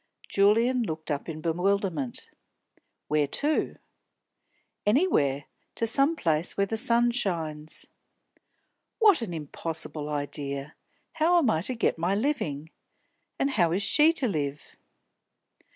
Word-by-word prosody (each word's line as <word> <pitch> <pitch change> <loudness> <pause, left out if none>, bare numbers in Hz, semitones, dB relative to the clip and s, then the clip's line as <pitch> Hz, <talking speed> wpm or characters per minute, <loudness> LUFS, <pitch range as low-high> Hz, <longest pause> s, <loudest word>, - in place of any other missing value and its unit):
Julian 230 +6 +3
looked 160 -8 -4
up 145 +3 -3
in 155 -1 -6
bewilderment. 175 -5 -1 0.8
"Where 150 -1 +1
to?" 295 - 0 1.1
"Anywhere. 205 - +2 0.3
To 230 - 0
some 275 +7 +3
place 165 - +1
where 200 - +2
the 225 - -3
sun 235 +1 +4
shines." 160 -9 -2 1.1
"What 420 - +5
an 220 -6 -4
impossible 160 -1 -5
idea! 145 0 -4 0.4
How 330 +2 +3
am 275 -10 +3
I 160 - 0
to 250 +8 0
get 225 - 0
my 175 +4 +1
living? 180 - -2 0.7
And 275 - 0
how 175 -10 +2
is 195 +3 0
she 305 +9 +5
to 275 -6 0
live?" 145 -7 -4
180 Hz, 120 wpm, -27 LUFS, 150-240 Hz, 1.1 s, What